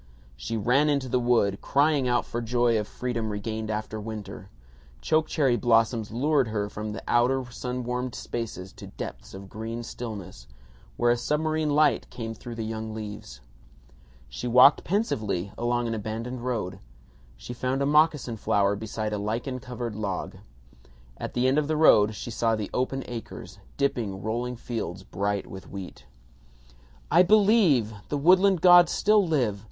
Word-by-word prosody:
She 60 Hz, -, -4 dB
ran 125 Hz, +8 st, +3 dB
into 140 Hz, -3 st, 0 dB
the 125 Hz, 0 st, +1 dB
wood, 115 Hz, -5 st, +2 dB
crying 145 Hz, -1 st, +2 dB
out 120 Hz, -1 st, +1 dB
for 120 Hz, -, -4 dB
joy 120 Hz, -1 st, +2 dB
of 105 Hz, -, -4 dB
freedom 120 Hz, -3 st, -3 dB
regained 110 Hz, +1 st, -4 dB
after 110 Hz, 0 st, -3 dB
winter. 105 Hz, -3 st, -7 dB, 0.5 s
Choke 155 Hz, -, +1 dB
cherry 135 Hz, -6 st, +2 dB
blossoms 115 Hz, -2 st, +2 dB
lured 135 Hz, +3 st, +1 dB
her 105 Hz, -2 st, -2 dB
from 105 Hz, +1 st, -5 dB
the 105 Hz, -, -7 dB
outer 125 Hz, +2 st, +2 dB
sun 125 Hz, +1 st, -4 dB
warmed 125 Hz, 0 st, -3 dB
spaces 100 Hz, -5 st, -6 dB
to -, -, -9 dB
depths -, -, -8 dB
of 95 Hz, 0 st, -9 dB
green 115 Hz, +3 st, -6 dB
stillness, 100 Hz, -, -8 dB, 0.5 s
where 120 Hz, -, +3 dB
a 120 Hz, -, +2 dB
submarine 155 Hz, +4 st, 0 dB
light 150 Hz, -1 st, +2 dB
came 115 Hz, -2 st, -6 dB
through 115 Hz, +2 st, -9 dB
the 115 Hz, -1 st, -4 dB
young 110 Hz, 0 st, -5 dB
leaves. 105 Hz, -, -8 dB, 0.9 s
She 60 Hz, -, -6 dB
walked 125 Hz, +4 st, +6 dB
pensively 110 Hz, -, -1 dB
along 120 Hz, 0 st, -1 dB
an 115 Hz, -, -2 dB
abandoned 115 Hz, +3 st, -5 dB
road. 105 Hz, -7 st, -3 dB, 0.6 s
She -, -, -8 dB
found 130 Hz, +3 st, -1 dB
a -, -, +1 dB
moccasin 150 Hz, -5 st, +2 dB
flower 100 Hz, -1 st, +1 dB
beside 110 Hz, 0 st, -4 dB
a 105 Hz, -, -2 dB
lichen 115 Hz, +5 st, -3 dB
covered 120 Hz, -3 st, -6 dB
log. 100 Hz, -3 st, -4 dB, 0.8 s
At -, -, -6 dB
the 125 Hz, +1 st, +2 dB
end 135 Hz, +3 st, +3 dB
of 150 Hz, -, -1 dB
the 155 Hz, 0 st, 0 dB
road 105 Hz, -9 st, +5 dB
she 120 Hz, -, -6 dB
saw 115 Hz, 0 st, +1 dB
the 105 Hz, -2 st, -5 dB
open 130 Hz, +1 st, -1 dB
acres 120 Hz, -2 st, -8 dB, 0.2 s
dipping 115 Hz, -9 st, -1 dB
rolling 120 Hz, +3 st, -2 dB
fields 110 Hz, -6 st, -5 dB
bright 100 Hz, +1 st, -2 dB
with 95 Hz, 0 st, -10 dB
wheat. 95 Hz, -2 st, -9 dB, 1.0 s
"I 175 Hz, -, +7 dB
believe! 190 Hz, -, +4 dB, 0.2 s
The 145 Hz, -, -1 dB
woodland 185 Hz, +4 st, +4 dB
gods 175 Hz, -2 st, +7 dB
still 210 Hz, 0 st, +3 dB
live! 125 Hz, -11 st, 0 dB
120 Hz, 160 wpm, -26 LUFS, 105-135 Hz, 1.0 s, I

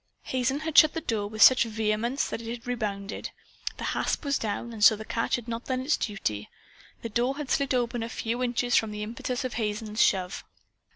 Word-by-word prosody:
Hazen 260 Hz, +3 st, -1 dB
had 315 Hz, -1 st, -4 dB
shut 310 Hz, -1 st, +7 dB
the 325 Hz, -, -2 dB
door 215 Hz, -7 st, -1 dB
with 215 Hz, +1 st, +3 dB
such 260 Hz, -, +8 dB
vehemence 225 Hz, +4 st, -1 dB
that -, -, -4 dB
it 225 Hz, -, -7 dB
had 235 Hz, 0 st, -6 dB
rebounded. 210 Hz, -5 st, -3 dB, 0.5 s
The -, -, -6 dB
hasp -, -, -1 dB
was 280 Hz, -1 st, +1 dB
down, 230 Hz, +2 st, -3 dB
and 215 Hz, -2 st, -3 dB
so 220 Hz, -, +8 dB
the 220 Hz, +1 st, -8 dB
catch 230 Hz, -, 0 dB
had 245 Hz, -1 st, -6 dB
not 230 Hz, 0 st, -4 dB
done 255 Hz, -1 st, -1 dB
its 280 Hz, +4 st, +2 dB
duty. 110 Hz, -, -3 dB, 0.5 s
The 230 Hz, -, -3 dB
door 245 Hz, +5 st, 0 dB
had 295 Hz, -4 st, -5 dB
slid 275 Hz, -2 st, +1 dB
open 240 Hz, -1 st, 0 dB
a 230 Hz, -, -3 dB
few 230 Hz, +2 st, -3 dB
inches 245 Hz, 0 st, +1 dB
from 220 Hz, -, +3 dB
the 210 Hz, 0 st, -5 dB
impetus 240 Hz, +3 st, -3 dB
of 255 Hz, -, -3 dB
Hazen's 215 Hz, 0 st, -2 dB
shove. 185 Hz, -2 st, +1 dB
230 Hz, 215 wpm, -27 LUFS, 215-255 Hz, 0.5 s, such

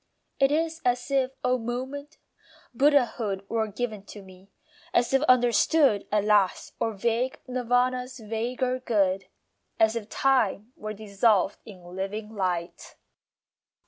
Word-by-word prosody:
It 275 Hz, 0 st, +4 dB
is 325 Hz, +1 st, 0 dB
as 245 Hz, +2 st, 0 dB
if, 265 Hz, -2 st, +2 dB
a 250 Hz, 0 st, +2 dB
moment, 265 Hz, +6 st, -5 dB, 0.6 s
Buddhahood 240 Hz, -7 st, +2 dB
Were 225 Hz, 0 st, 0 dB
given 215 Hz, 0 st, -4 dB
to 205 Hz, -, -10 dB
me; 190 Hz, +1 st, -16 dB, 0.5 s
as 240 Hz, +2 st, +2 dB
if 270 Hz, -, +4 dB
understood 245 Hz, -1 st, +4 dB
At 210 Hz, -1 st, +2 dB
last 205 Hz, -3 st, +2 dB
were 225 Hz, -, 0 dB
vague 235 Hz, +5 st, -1 dB
Nirvana's 250 Hz, +1 st, 0 dB
vaguer 245 Hz, +3 st, -2 dB
good; 195 Hz, -6 st, 0 dB, 0.5 s
As 220 Hz, +1 st, +4 dB
if 225 Hz, -2 st, -5 dB
time 245 Hz, -4 st, +1 dB
were 215 Hz, 0 st, -6 dB
dissolved 205 Hz, -1 st, +1 dB
in 190 Hz, -5 st, -12 dB
living 210 Hz, +3 st, -4 dB
light. 180 Hz, -4 st, -3 dB
230 Hz, 125 wpm, -26 LUFS, 205-255 Hz, 0.6 s, It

